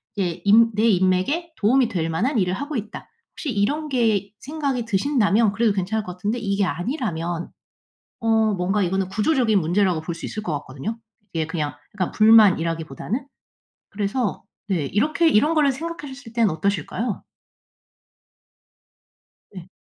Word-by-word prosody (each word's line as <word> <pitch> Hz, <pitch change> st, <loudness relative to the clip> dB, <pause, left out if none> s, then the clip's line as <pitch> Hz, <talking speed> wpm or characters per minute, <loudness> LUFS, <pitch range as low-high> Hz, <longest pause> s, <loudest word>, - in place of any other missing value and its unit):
이제 180 Hz, -5 st, -2 dB
인 225 Hz, +3 st, +6 dB
내 215 Hz, +2 st, +2 dB
인맥에 190 Hz, -, +1 dB
도움이 240 Hz, +3 st, +3 dB
될 165 Hz, -6 st, -2 dB
만한 225 Hz, -, 0 dB
일을 180 Hz, -1 st, +1 dB
하고 285 Hz, +7 st, -4 dB
있다.' 215 Hz, -1 st, -7 dB, 0.3 s
혹시 295 Hz, -, -4 dB
이런 285 Hz, +9 st, 0 dB
게 220 Hz, -6 st, +1 dB
생각이 275 Hz, -5 st, -3 dB
드신다면 225 Hz, -1 st, +2 dB
그래도 220 Hz, -2 st, +2 dB
괜찮을 200 Hz, +3 st, -1 dB
것 180 Hz, -, -6 dB
같은데 210 Hz, +6 st, -2 dB
이게 200 Hz, -2 st, 0 dB
아니라면 175 Hz, -, -3 dB, 0.7 s
어 225 Hz, -, -2 dB, 0.3 s
뭔가 190 Hz, +3 st, 0 dB
이거는 190 Hz, +1 st, 0 dB
구조적인 220 Hz, 0 st, +2 dB
문제라고 180 Hz, +1 st, +1 dB
볼 170 Hz, +1 st, -4 dB
수 170 Hz, -, -10 dB
있을 215 Hz, -, -5 dB
것 175 Hz, -, -3 dB
같거든요, 150 Hz, -, -6 dB, 0.3 s
이게 160 Hz, -2 st, -1 dB
그냥 155 Hz, -3 st, -3 dB, 0.2 s
약간 185 Hz, -4 st, -2 dB
불만이라기보다는. 200 Hz, -, +3 dB, 0.6 s
그래서 205 Hz, +2 st, -2 dB, 0.2 s
네. 170 Hz, -8 st, 0 dB
이렇게 300 Hz, -, +2 dB
이런 295 Hz, +9 st, +3 dB
거를 290 Hz, -3 st, +4 dB
생각하셨을 280 Hz, -5 st, -7 dB
땐 230 Hz, -3 st, +3 dB
어떠실까요? 200 Hz, +6 st, -2 dB, 2.3 s
네. 180 Hz, -1 st, -10 dB
210 Hz, 325 characters per minute, -23 LUFS, 180-245 Hz, 2.3 s, 인